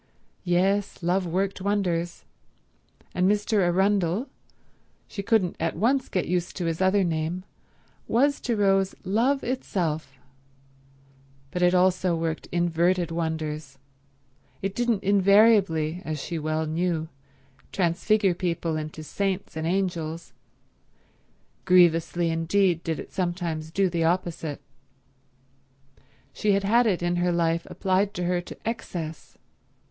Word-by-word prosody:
Yes, 190 Hz, +2 st, +1 dB
love 180 Hz, +2 st, +1 dB
worked 190 Hz, +3 st, -1 dB
wonders, 180 Hz, -4 st, -1 dB, 0.9 s
and 185 Hz, +1 st, +2 dB
Mr. 210 Hz, +1 st, +1 dB
Arundel—she 190 Hz, -, -2 dB
couldn't 200 Hz, -3 st, +1 dB
at 165 Hz, 0 st, -1 dB
once 255 Hz, +9 st, +1 dB
get 185 Hz, -, -1 dB
used 175 Hz, 0 st, -2 dB
to 180 Hz, -, -2 dB
his 165 Hz, +1 st, -2 dB
other 190 Hz, +1 st, +3 dB
name—was 185 Hz, -, -2 dB
to 240 Hz, -, -1 dB
Rose 195 Hz, -2 st, +2 dB
Love 235 Hz, +9 st, +1 dB
itself; 160 Hz, -, -2 dB, 1.3 s
but 180 Hz, -, -3 dB
it 180 Hz, +1 st, +4 dB
also 185 Hz, -1 st, +3 dB
worked 165 Hz, -1 st, -3 dB
inverted 175 Hz, 0 st, +1 dB
wonders, 155 Hz, -4 st, -3 dB, 0.9 s
it 195 Hz, 0 st, -1 dB
didn't 235 Hz, -3 st, 0 dB
invariably, 195 Hz, -5 st, +4 dB
as 155 Hz, -1 st, -4 dB
she 165 Hz, +3 st, -4 dB
well 155 Hz, +1 st, -1 dB
knew, 160 Hz, 0 st, -1 dB, 0.6 s
transfigure 190 Hz, +3 st, +2 dB
people 170 Hz, -2 st, -2 dB
into 155 Hz, 0 st, -6 dB
saints 195 Hz, +3 st, -3 dB
and 160 Hz, 0 st, -2 dB
angels. 170 Hz, -3 st, -2 dB, 1.3 s
Grievously 170 Hz, -2 st, +3 dB
indeed 170 Hz, +1 st, +1 dB
did 160 Hz, -2 st, -2 dB
it -, -, -9 dB
sometimes 175 Hz, -4 st, -2 dB
do 195 Hz, +4 st, +1 dB
the 170 Hz, -2 st, -1 dB
opposite. 165 Hz, -3 st, -1 dB, 1.7 s
She 210 Hz, +6 st, +1 dB
had 200 Hz, 0 st, +1 dB
had 230 Hz, +4 st, +4 dB
it 180 Hz, -5 st, 0 dB
in 175 Hz, 0 st, 0 dB
her 175 Hz, 0 st, +1 dB
life 170 Hz, -1 st, 0 dB
applied 195 Hz, +2 st, 0 dB
to 180 Hz, -, -2 dB
her 175 Hz, 0 st, 0 dB
to 175 Hz, -, -10 dB
excess. 170 Hz, -8 st, -5 dB
180 Hz, 120 wpm, -26 LUFS, 165-195 Hz, 1.7 s, it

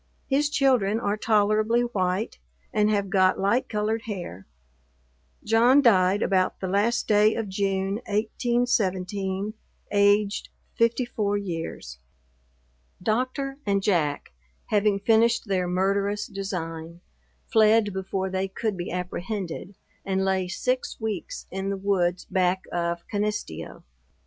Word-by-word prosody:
His 290 Hz, +2 st, +2 dB
children 250 Hz, -8 st, +2 dB
are 205 Hz, -2 st, 0 dB
tolerably 215 Hz, +2 st, +2 dB
white, 200 Hz, -3 st, -1 dB, 0.3 s
and 210 Hz, -1 st, +3 dB
have 200 Hz, -3 st, 0 dB
got 185 Hz, -1 st, +4 dB
light 205 Hz, +6 st, +1 dB
colored 215 Hz, +1 st, -1 dB
hair. 175 Hz, -, -6 dB, 1.0 s
John 235 Hz, +5 st, +5 dB
died 195 Hz, -6 st, +4 dB
about 185 Hz, -1 st, +1 dB
the 190 Hz, -, -3 dB
last 205 Hz, +5 st, +1 dB
day 210 Hz, +1 st, +4 dB
of 225 Hz, -2 st, -2 dB
June, 195 Hz, 0 st, -1 dB
1817, 205 Hz, -3 st, 0 dB, 0.4 s
aged 205 Hz, 0 st, +2 dB, 0.2 s
54 230 Hz, -3 st, +1 dB
years. 165 Hz, -, -5 dB, 1.0 s
Doctor 255 Hz, +7 st, -1 dB
and 200 Hz, -1 st, 0 dB
Jack, 160 Hz, -8 st, 0 dB, 0.4 s
having 205 Hz, -1 st, +3 dB
finished 230 Hz, +3 st, +3 dB
their 185 Hz, -2 st, 0 dB
murderous 200 Hz, +3 st, 0 dB
design, 170 Hz, -4 st, -5 dB, 0.4 s
fled 220 Hz, -2 st, +4 dB
before 190 Hz, 0 st, -3 dB
they 190 Hz, +1 st, -1 dB
could 210 Hz, +2 st, -3 dB
be 175 Hz, -1 st, -5 dB
apprehended, 180 Hz, +1 st, -4 dB, 0.3 s
and 190 Hz, 0 st, 0 dB
lay 190 Hz, -1 st, +1 dB
six 250 Hz, +7 st, -2 dB
weeks 220 Hz, -, -4 dB
in 195 Hz, +1 st, -3 dB
the 200 Hz, -, -2 dB
woods 185 Hz, -2 st, 0 dB
back 185 Hz, 0 st, +1 dB
of 170 Hz, 0 st, -2 dB
Canisteo. 205 Hz, -, -4 dB
200 Hz, 115 wpm, -25 LUFS, 185-220 Hz, 1.0 s, John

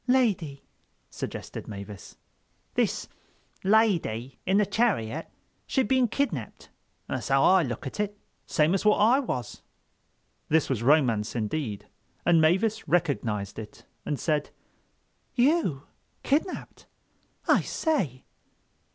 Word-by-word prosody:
"Lady," 200 Hz, -, +1 dB, 0.5 s
suggested -, -, -6 dB
Mavis. 100 Hz, -1 st, -9 dB, 0.6 s
"This -, -, 0 dB, 0.6 s
lydy 175 Hz, -, +2 dB
in 190 Hz, +2 st, +4 dB
the 210 Hz, -, +4 dB
chariot, 180 Hz, -, 0 dB, 0.4 s
she'd 265 Hz, -5 st, +1 dB
been 260 Hz, +1 st, +3 dB
kidnapped—that's 220 Hz, -, -5 dB
how 135 Hz, 0 st, +3 dB
I 190 Hz, 0 st, +6 dB
look 125 Hz, -5 st, -4 dB
at 135 Hz, -, -6 dB
it. 205 Hz, 0 st, -1 dB, 0.3 s
Same 155 Hz, +2 st, +3 dB
as 195 Hz, -, 0 dB
what 210 Hz, 0 st, +5 dB
I 235 Hz, +6 st, +5 dB
was." 125 Hz, -, -4 dB, 0.9 s
This 160 Hz, -3 st, +2 dB
was 120 Hz, -4 st, 0 dB
romance 120 Hz, -6 st, +3 dB
indeed; 110 Hz, -1 st, -2 dB, 0.4 s
and 170 Hz, -2 st, +5 dB
Mavis 190 Hz, +7 st, +2 dB
recognized 115 Hz, -, 0 dB
it 105 Hz, -1 st, -10 dB, 0.2 s
and 145 Hz, -, -2 dB
said: 150 Hz, -3 st, 0 dB, 0.9 s
"You, 245 Hz, -, +2 dB, 0.4 s
kidnapped? 315 Hz, +6 st, -2 dB, 0.6 s
I -, -, +5 dB
say!" 180 Hz, -, -1 dB
160 Hz, 110 wpm, -27 LUFS, -, 0.9 s, I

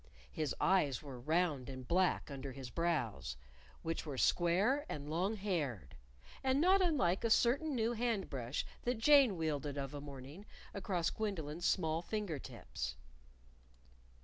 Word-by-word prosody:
His 155 Hz, -2 st, -2 dB
eyes 155 Hz, -10 st, +2 dB
were 135 Hz, -4 st, -8 dB
round 150 Hz, -1 st, 0 dB
and 130 Hz, -2 st, -7 dB
black 180 Hz, -3 st, +2 dB
under 135 Hz, 0 st, -5 dB
his 130 Hz, -2 st, -8 dB
brows, 135 Hz, -, -1 dB, 0.5 s
which 165 Hz, 0 st, -2 dB
were 145 Hz, -4 st, -5 dB
square 190 Hz, -, +3 dB
and 145 Hz, -1 st, -5 dB
long 180 Hz, +8 st, 0 dB
haired, 150 Hz, -, -2 dB, 0.5 s
and 265 Hz, +1 st, +3 dB
not 375 Hz, +4 st, +5 dB
unlike 255 Hz, -, +2 dB
a 230 Hz, -, +2 dB
certain 270 Hz, +7 st, +3 dB
new 230 Hz, 0 st, +1 dB
hand 230 Hz, -4 st, 0 dB
brush 125 Hz, -1 st, -3 dB, 0.2 s
that 245 Hz, 0 st, -1 dB
Jane 265 Hz, -4 st, +6 dB
wielded 145 Hz, -3 st, -2 dB
of 135 Hz, 0 st, -3 dB
a 145 Hz, -, -5 dB
morning 140 Hz, +7 st, -9 dB, 0.3 s
across 185 Hz, -4 st, -1 dB
Gwendolyn's 175 Hz, -6 st, -2 dB
small 160 Hz, -3 st, +1 dB
finger 195 Hz, -5 st, -3 dB
tips. 65 Hz, -, -6 dB
170 Hz, 145 wpm, -36 LUFS, 140-215 Hz, 0.5 s, Jane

